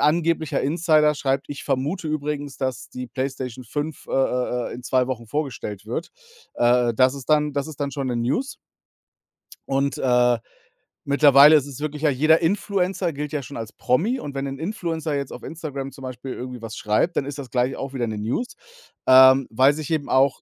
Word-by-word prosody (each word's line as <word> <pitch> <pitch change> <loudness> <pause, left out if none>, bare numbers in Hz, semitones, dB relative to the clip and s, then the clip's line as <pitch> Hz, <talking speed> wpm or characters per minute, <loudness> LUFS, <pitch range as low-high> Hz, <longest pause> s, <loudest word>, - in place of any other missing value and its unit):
angeblicher 160 0 +1
Insider 155 0 +3
schreibt: 135 -1 -1
„Ich 145 - -6
vermute 155 +6 -1
übrigens, 145 -2 -3
dass 130 -3 -3
die 125 0 -6
Playstation 130 -1 -4
5, 145 +5 -5
äh, - - -7
äh, 125 -2 0
äh, - - -6
in 125 - -9
2 125 0 +1
Wochen 120 -3 -4
vorgestellt 110 -6 -4
wird.“ 125 +9 -4 0.4
Äh, 120 0 +3
das 130 +3 +4
ist 135 0 -9
dann 150 -1 +3
das 140 0 -2
ist 155 - -10
dann 140 -1 -1
schon 140 -3 -3
'ne 120 - -1
News. 135 - -1 1.1
Und, 140 +1 0
äh, 125 -1 +3 0.7
mittlerweile 140 +1 +7
ist 145 -1 -1
es 140 +1 -9
wirklich 150 0 -4
ja, 150 - +4
jeder 155 +4 +3
Influencer 190 0 0
gilt 150 +1 -5
ja 145 - -1
schon 140 - -8
als 115 -1 -6
Promi. 205 - 0
Und 140 - -6
wenn 135 0 -2
'n 135 - -5
Influencer 165 -4 -3
jetzt 140 -1 -3
auf - - -10
Instagram 140 -4 -6
zum 135 - -13
Beispiel 130 +1 -6
irgendwie 125 -1 -7
was 115 -1 -7
schreibt, 105 +12 0
dann - - +1
ist 145 0 -6
das 135 -3 -7
gleich 125 +1 0
auch 135 0 -6
wieder 120 -3 -1
'ne 110 -1 -4
News. 120 - -3 0.5
Ähm, 130 0 +7
weil 130 +5 +4
sich 155 +1 -6
eben 150 -3 0
auch 135 +1 +3
140 Hz, 195 wpm, -23 LUFS, 125-150 Hz, 1.1 s, mittlerweile